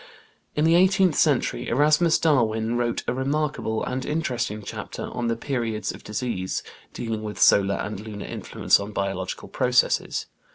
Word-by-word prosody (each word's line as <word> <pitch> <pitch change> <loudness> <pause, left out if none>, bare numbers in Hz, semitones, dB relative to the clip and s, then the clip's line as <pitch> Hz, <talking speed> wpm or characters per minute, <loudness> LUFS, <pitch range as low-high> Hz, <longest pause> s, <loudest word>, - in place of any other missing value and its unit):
In 150 - +2
the 165 - +5
eighteenth 185 -1 +4
century 145 -4 +1
Erasmus 150 +6 +4
Darwin 115 -7 +1
wrote 120 -1 -1
a - - +1
remarkable 135 -4 -1
and 130 +1 -3
interesting 125 -9 -2
chapter - - -6
on 120 -1 -3
"The 115 - +1
Periods 115 -5 -2
of - - -12
Disease," 105 -4 -3 0.3
dealing 115 -2 -4
with 105 -1 -6
solar 100 0 +5
and 105 0 -4
lunar 105 -1 -7
influence - - +1
on 100 +1 -6
biological 95 -2 -3
processes. 125 0 +1
120 Hz, 150 wpm, -24 LUFS, 105-150 Hz, 0.3 s, the